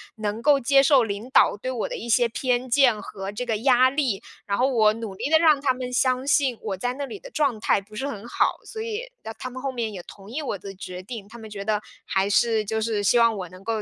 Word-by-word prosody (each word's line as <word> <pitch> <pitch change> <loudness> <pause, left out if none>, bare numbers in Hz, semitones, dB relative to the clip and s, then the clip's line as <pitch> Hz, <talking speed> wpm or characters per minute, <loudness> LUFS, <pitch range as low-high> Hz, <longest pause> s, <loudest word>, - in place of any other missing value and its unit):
能 215 0 -3
够 285 +1 +4
接 275 +2 +4
受 275 -3 +5
领 210 +4 -5
导 - - +5
对 255 +5 -4
我 240 -4 -2
的 - - -4
一 235 - -7
些 240 +1 +4
偏 250 +2 -1
见 245 -4 +4
和 195 0 -6
这 245 +4 -4
个 225 -2 0
压 255 +2 +4
力。 260 -8 -1 0.2
然 200 0 -1
后 255 +2 +3
我 220 -5 +4
努 225 -3 -6
力 275 - -3
地 320 - +6
让 310 -4 +4
他 270 -2 +2
们 255 0 -6
相 255 +1 +1
信 270 -4 +2
我 205 -3 -3
在 245 +6 -2
那 285 - -4
里 400 - -8
的 - - -11
状 280 -7 +1
态 205 - +3
不 210 +2 -16
是 265 - -3
很 230 -5 -7
好， - - +1
所 440 - -7
以， 460 +2 -4
那 220 - -6
他 255 - -6
们 255 +1 -8
后 275 0 -2
面 230 -4 -3
也 180 -3 -7
同 200 0 -13
意 285 +7 -4
我 265 -8 -3
的 195 +1 -9
决 185 -1 -7
定， 220 -1 -7
他 235 - -11
们 220 -1 -10
觉 200 -1 -6
得 210 -1 0 0.2
还 195 +1 0
是 220 0 +2
就 220 +1 -2
是 215 -2 -1
希 220 +4 +4
望 230 -1 +4
我 180 -2 -6
能 185 +2 -14
够 220 0 -2
235 Hz, 290 characters per minute, -24 LUFS, 210-265 Hz, 0.2 s, 地